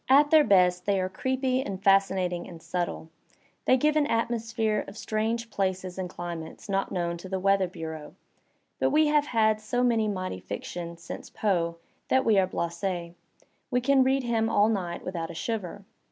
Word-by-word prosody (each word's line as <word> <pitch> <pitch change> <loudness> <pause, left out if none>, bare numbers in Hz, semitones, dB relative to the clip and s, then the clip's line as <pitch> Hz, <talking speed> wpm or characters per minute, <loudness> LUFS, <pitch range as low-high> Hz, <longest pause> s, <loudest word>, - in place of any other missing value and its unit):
At 285 +2 +6
their 310 -1 +7
best 180 -5 +3
they 200 -1 +2
are 185 0 -1
creepy 260 +5 0
and 195 -7 -5
fascinating 190 -3 +2
and 170 - -10
subtle; 165 -1 -4 0.5
they 255 - +5
give 300 +3 +2
an 300 -2 +3
atmosphere 225 -3 0
of 195 - -10
strange 225 +1 -2
places 185 -2 -2
and 185 -1 -3
cli 175 -1 -5
mates 160 -1 -9
not 195 -1 -1
known 170 -1 -1
to 185 +2 -10
the 190 - -1
weather 195 0 +3
bureau, 160 -3 -7 0.6
but - - +3
we 305 0 +4
have 295 -1 +3
had 220 -3 +2
so 245 +3 0
much 235 -2 +3
mighty 185 - -2
fiction 170 - -6
since 170 0 -8
Poe 170 -5 0 0.3
that 260 0 +2
we 215 -3 +5
are 185 - +2
blasSs; 170 0 -3 0.6
we 250 - +2
can 265 +1 +4
read 265 +1 +2
him 225 -2 +1
all 205 +1 +4
night 180 -5 -3
without 170 -3 -4
a 170 - -8
shiver. 200 0 -4
195 Hz, 180 wpm, -27 LUFS, 175-230 Hz, 0.6 s, their